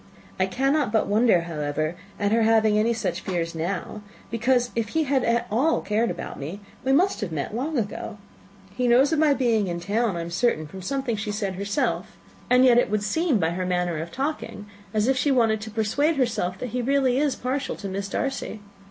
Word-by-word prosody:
I 185 - +3
cannot 270 +4 +1
but 220 -1 +2
wonder, 210 -3 +3
however, 155 -1 -2 0.2
at 205 0 +1
her 230 +1 +3
having 220 -1 +4
any 215 +2 +3
such 225 -1 -2
fears 170 -3 -2
now, 180 +5 -4 0.3
because 245 +1 +1
if 225 -2 -1
he 320 - +3
had 270 -3 +1
at 235 0 +1
all 275 +9 +2
cared 220 +3 0
about - - -6
me, 155 +8 -6 0.2
we 265 - +1
must 355 +5 +3
have 200 -5 -3
met 155 +4 -3
long, 290 +6 -2
long - - +1
ago. 215 -1 -3 0.6
He 250 +2 0
knows 260 +6 +5
of 315 - +2
my 300 -2 +4
being 230 -6 +1
in 170 -1 -3
town, 205 +2 0
I - - -2
am 170 +1 -6
certain, 170 -5 +1
from 190 +6 -9
something 265 +3 -2
she 210 0 -3
said 205 -2 -2
herself; 200 +2 -2 0.3
and 250 +1 +6
yet 240 -2 +6
it 245 - +1
would 210 0 0
seem, 310 +5 +1
by 165 -4 +1
her 185 +2 -2
manner 180 -3 -1
of 170 +1 -7
talking, 275 - -4 0.3
as 215 +2 +1
if 265 0 +2
she 270 +3 +1
wanted 225 -5 +3
to 220 - -6
persuade 225 +9 +1
herself 220 -9 0
that 250 - -5
he 250 - -2
is 240 - -3
really 275 +1 +3
partial 260 +3 -2
to 200 - -6
Miss 195 +1 -4
Darcy. 265 -2 -3
220 Hz, 215 wpm, -25 LUFS, 190-255 Hz, 0.6 s, and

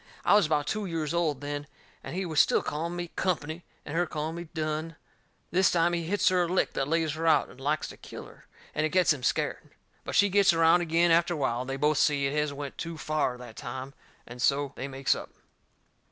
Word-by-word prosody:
I - - +5
was 205 -6 +5
about 150 -2 +1
two 210 +5 -2
years 165 -3 -2
old 160 -5 0
then 145 0 -4 0.4
and - - -6
he 190 0 -1
was 160 -3 0
still - - +4
calling 165 +3 -3
me 175 -1 -4
Company 165 -2 -2 0.2
and 150 - -6
her 175 +1 +1
calling 155 +1 -3
me 170 0 -6
Dunne. 155 0 -3 0.6
This 185 +2 +4
time 170 0 +2
he 170 -1 -1
hits 200 +5 +2
her 185 -1 +2
a 175 - +1
lick 185 +2 0
that 135 - -1
lays 160 -1 +1
her 165 +1 -2
out 155 -2 +4
and 130 - -15
likes 150 +2 0
to - - -11
kill - - -9
her, - - -17 0.3
and 155 - 0
it 155 - +1
gets 180 -1 +4
him 140 - -8
scared. - - -1 0.3
But - - -5
she 205 - +5
gets 195 -2 +5
around 165 +1 +5
agin 170 +1 +2
after 170 +1 +3
a - - -5
while, 125 -4 0
and 130 - -6
they 135 - -2
both 150 +1 +2
see 140 -2 +3
it 135 - -1
has 150 -1 0
went 140 -1 -7
too 165 -1 -5
fur 155 -5 -1
that 120 -3 -11
time, 130 +2 -6 0.3
and 120 +1 -9
so 140 +1 +1
they 135 - -5
makes 135 0 +1
up. - - -7
155 Hz, 240 wpm, -28 LUFS, 145-170 Hz, 0.6 s, I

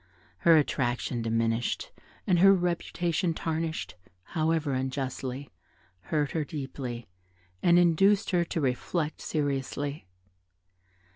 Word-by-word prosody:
Her 165 -1 +6
attraction 120 -4 0
diminished 115 +1 0 0.3
and 180 -3 +3
her 195 +2 +8
reputation 175 -1 -1
tarnished 160 0 -2 0.3
(however 160 - 0
unjustly) 130 0 -3 0.5
hurt 150 -3 0
her 160 - 0
deeply, 130 -5 -6 0.5
and 175 0 +5
induced 195 +5 +4
her 175 -2 +3
to 170 - -3
reflect 150 +4 -1
seriously. 140 - -2
150 Hz, 95 wpm, -28 LUFS, 130-170 Hz, 0.5 s, her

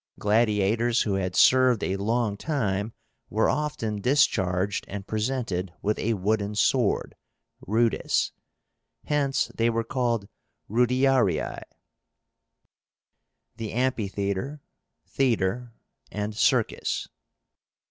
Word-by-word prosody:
Gladiators 110 +2 +2
who 105 - -1
had 95 -2 -2
served 130 -3 +5
a 95 - 0
long 110 +1 0
time, 105 -6 -2 0.4
were 110 +2 +2
often 115 -9 -2
discharged 95 -7 +1
and 100 -1 -6
presented 110 -5 -2
with 105 +1 0
a 115 +1 0
wooden 105 +1 -1
sword 120 0 +1 0.5
(rudis), 115 +3 +1 0.7
Hence 140 -2 0
they 115 +1 +1
were 115 0 0
called 115 -5 -1 0.4
rudiarii. 125 - +2 2.0
THE 110 -2 -5
AMPHITHEATRE, 110 +1 -2 0.5
THEATRE, 120 -2 0 0.4
AND 105 +1 -4
CIRCUS. - - +1
110 Hz, 90 wpm, -26 LUFS, 100-125 Hz, 2.0 s, served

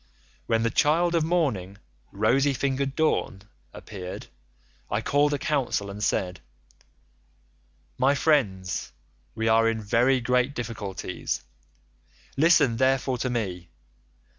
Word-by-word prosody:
When 115 0 +1
the 115 - +1
child 165 +6 +2
of 165 -2 +2
morning, 135 - -1 0.3
rosy 135 +7 +2
fingered 135 +1 -1
Dawn, 155 -11 0 0.3
appeared, 95 -3 -8 0.6
I - - 0
called 145 +1 +2
a 145 - 0
council 130 -9 -1
and 105 +1 -6
said, 90 -2 -1 1.6
'My 135 +2 +3
friends, 105 - 0 0.4
we 110 0 -1
are 115 0 +4
in 115 0 -2
very 120 +5 +2
great 125 +3 +1
difficulties; 105 - -4 0.9
listen 140 -6 +4
therefore 130 -1 +1
to 130 - -1
me. 95 -8 -3
125 Hz, 115 wpm, -26 LUFS, 105-140 Hz, 1.6 s, are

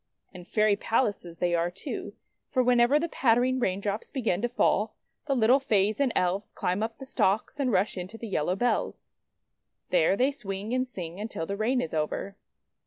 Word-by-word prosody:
And 180 -1 -11
Fairy 215 0 +3
Palaces 205 -6 -1
they 175 0 0
are 170 0 +1
too, 180 +2 -6 0.3
for 255 -3 +2
whenever 245 +3 +4
the 335 - -1
pattering 255 -2 +2
raindrops 200 0 -2
begin 220 -8 -1
to 240 - 0
fall, 220 -3 +1 0.3
the 275 - +1
little 245 +3 +5
Fays 210 -4 +1
and 275 -3 +2
Elves 185 +3 0
climb 180 +3 -1
up 225 +1 -3
the 270 - -9
stalks, 220 +2 0
and 265 -3 +1
rush 190 0 +1
into 185 +5 -7
the 230 - -7
yellow 180 -2 0
bells. 245 +5 -1 0.8
There - - +3
they 260 +5 +3
swing 205 -4 -5
and 255 0 0
sing 175 -5 -7
until 210 -6 -4
the 200 - -3
rain 235 +5 +1
is 160 - -5
over. 160 +5 -2
215 Hz, 180 wpm, -28 LUFS, 190-250 Hz, 0.8 s, little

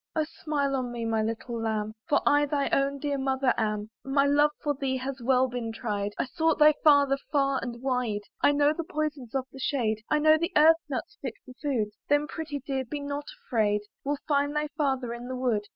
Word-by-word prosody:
Oh! 315 - +2
smile 295 -5 -1
on 250 -2 -2
me, 235 -1 -4
my 225 -1 +1
little 230 +1 -3
lamb! 215 -1 -1 0.2
For 290 - +3
I 290 0 +4
thy 280 -1 0
own 275 +1 +1
dear 280 0 -2
mother 265 -1 +1
am. 210 -1 -2
My 275 +1 +2
love 290 +1 +4
for 295 - +1
thee 265 -1 -2
has 260 0 -5
well 255 +1 +3
been 245 -2 -4
tried: 205 -3 -3
I've 255 - -2
sought 320 +3 +1
thy 305 0 +7
father 285 -2 +5
far 275 -2 +2
and 240 -1 -6
wide. 250 -6 0 0.2
I - - +5
know 290 +1 +3
the 335 - -4
poisons 305 -7 -4
of 265 -1 0
the 270 - -11
shade, 225 -6 0
I 305 - +3
know 310 +1 +5
the 340 +3 -2
earth 320 +2 +7
nuts 265 - -5
fit 255 -5 -4
for 255 - -11
food; 250 -8 0 0.2
Then, 290 +1 +3
pretty 300 -2 -5
dear, 270 -2 -1
be 290 +4 -5
not 285 0 -4 0.2
afraid; 210 -3 +1 0.2
We'll 285 +1 -1
find 285 0 +1
thy 300 0 0
father 270 -5 -1
in 240 +1 -7
the 255 - -4
wood. 235 -5 0
270 Hz, 215 wpm, -28 LUFS, 240-290 Hz, 0.2 s, thy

